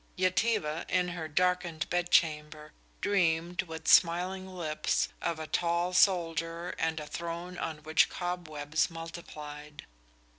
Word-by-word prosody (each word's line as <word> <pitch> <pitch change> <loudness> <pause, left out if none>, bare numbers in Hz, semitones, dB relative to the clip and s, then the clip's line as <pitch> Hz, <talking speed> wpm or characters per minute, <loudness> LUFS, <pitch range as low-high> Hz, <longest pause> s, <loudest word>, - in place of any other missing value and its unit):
Yetive, 190 +3 +2 0.2
in 180 -1 +2
her 170 -3 -4
darkened 175 0 0
bed 175 0 0
chamber, 150 -2 +1 0.3
dreamed, 175 -3 +1
with 160 -3 -8
smiling 185 +2 +4
lips, 170 -5 -1
of 165 - -1
a 160 - -5
tall 170 +2 0
soldier 170 -2 +2
and 160 -1 0
a 150 - -6
throne 170 +3 -5
on 150 -2 -4
which 155 +1 +4
cobwebs 160 -4 -2
multiplied. 150 -3 -9
170 Hz, 120 wpm, -30 LUFS, 155-180 Hz, 0.3 s, smiling